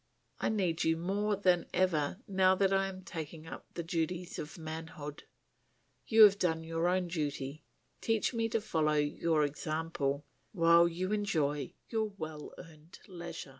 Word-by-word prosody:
I - - +1
need 185 -6 0
you 160 0 +2
more 200 +5 0
than 180 -3 +2
ever 180 0 +1
now 190 -1 +4
that 195 0 +2
I 195 0 +2
am 190 -1 -8
taking 160 -3 -7
up 160 - -9
the 170 - -3
duties 170 +1 -2
of 150 +2 -7
manhood. 160 -2 -7 0.8
You 225 -1 +8
have 200 -1 +7
done 160 -2 +1
your 165 +1 -1
own 180 0 +1
duty; 145 -3 -3 0.4
teach 225 +2 +1
me 230 -1 0
to 225 0 0
follow 160 -7 +1
your 150 +1 +1
example, 150 -1 -2 0.3
while 170 -2 +6
you 180 +3 -3
enjoy 155 -9 0
your 220 -2 0
well 155 -3 -6
earned 160 -1 -13
leisure." 170 -5 -7
170 Hz, 155 wpm, -32 LUFS, 155-190 Hz, 0.8 s, You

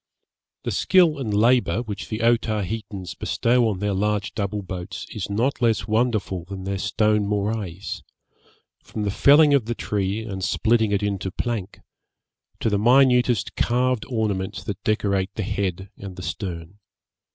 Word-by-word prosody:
The - - -2
skill 170 -6 +3
and 115 -6 -3
labour 115 -1 +3
which 105 -3 -6
the 110 0 -3
Otaheitans 105 -5 -1
bestow 120 +9 +1
on 100 - -2
their 105 +1 -1
large 105 +1 -1
double 100 0 -3
boats 90 -2 -6
is 105 -3 -4
not 120 +8 0
less 115 -4 +2
wonderful 110 -5 0
than 95 0 -7
their 95 0 -3
stone 105 0 +1
morais, 100 -3 -3 0.8
from 105 - -5
the 100 - 0
felling 145 +7 +6
of 135 -6 +3
the 120 +1 -2
tree 105 +1 -2
and 95 -4 -5
splitting 110 0 +2
it 100 0 +1
into 100 -2 -1
plank, 105 0 -4 0.8
to - - +2
the 100 - +2
minutest 125 -1 +4
carved 125 -1 +1
ornaments 100 -5 -2
that 100 0 -6
decorate 100 -3 +1
the 110 - -2
head 95 0 -3
and 95 -2 -8
the 90 - -8
stern. 90 -1 -5
105 Hz, 150 wpm, -23 LUFS, 95-115 Hz, 0.8 s, felling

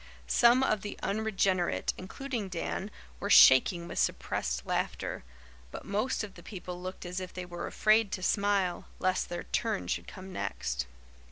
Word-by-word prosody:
Some 240 +2 +5
of 215 -6 +1
the 205 -1 -6
unregenerate, 195 -4 +1
including 230 +2 -5
Dan, 185 +3 -3 0.3
were 200 - -3
shaking 170 +2 +7
with - - -4
suppressed - - -1
laughter, - - -2 0.5
but - - -8
most 215 +5 -1
of 205 -2 -7
the 175 - -13
people 180 -2 -7
looked 185 0 -6
as 180 +1 -3
if 185 -1 -6
they 180 -1 -6
were 175 -1 -6
afraid 215 -1 +3
to 185 - -3
smile, 200 -3 +1
lest 185 0 0
their 175 - -4
turn 220 -3 -1
should - - -2
come 190 -1 -9
next. 60 - -3
190 Hz, 160 wpm, -30 LUFS, 175-210 Hz, 0.5 s, shaking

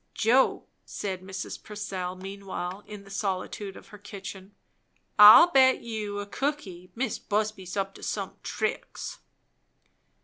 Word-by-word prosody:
"Joe," 245 +5 +3 0.2
said 190 -3 -5
Mrs. 190 0 -6
Purcell 190 -4 -5
meanwhile 195 0 -6
in 210 -1 -9
the 195 - -15
solitude 195 0 -3
of - - -15
her 210 - -12
kitchen, 195 -1 -9 0.6
"I'll 215 +12 +10
bet 260 -2 +5
you 215 -3 -4
a 205 - -3
cookie, 200 -7 -4
Mis' 240 -1 -2
Busby's 210 -3 -2
up 195 0 -1
to - - -14
some - - -4
tricks!" - - -4
200 Hz, 130 wpm, -27 LUFS, 190-215 Hz, 0.6 s, I'll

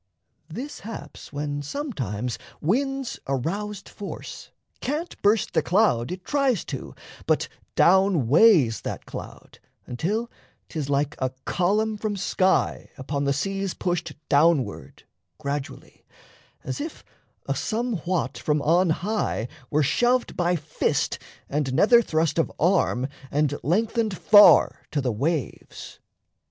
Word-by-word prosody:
This 250 - -6
haps 225 +2 -9
when 145 0 -3
sometimes 130 - -4 0.2
wind's 270 - -1
aroused 195 +10 -3
force 205 - -8 0.3
Can't 305 +6 -3
burst 210 +1 +2
the 160 - +3
cloud 175 - +2
it 180 0 -7
tries 275 - +1
to, - - -6 0.3
but - - +2 0.3
down 190 - +4
weighs 145 - +5
That - - -5
cloud, - - -10 0.3
until 205 - -2 0.4
'tis 150 -4 -4
like 145 +1 +1
a 130 - 0 0.2
column 210 +4 +1
from 210 -1 -3
sky 190 0 +1
Upon 140 +1 -3
the 140 - +2
seas 195 +6 -2
pushed 175 -2 -2
downward 145 -7 +1 0.3
gradually, 140 +1 -6 0.6
As - - -4
if 310 +2 -7 0.4
a - - 0
Somewhat 215 -7 -2
from 150 0 +1
on 175 +3 +3
high 175 - -1 0.2
were 150 +1 +2
shoved 245 - +1
By 175 0 +1
fist 155 -2 -1 0.3
and 140 -3 -1
nether 235 - +6
thrust 160 -5 0
of 165 - +1
arm, 165 -7 +2 0.2
and 145 0 +1
lengthened 215 +3 0
Far 205 -1 +6
to 150 - -1
the 130 -3 0
waves. 140 +5 -4
175 Hz, 120 wpm, -25 LUFS, 145-215 Hz, 0.6 s, nether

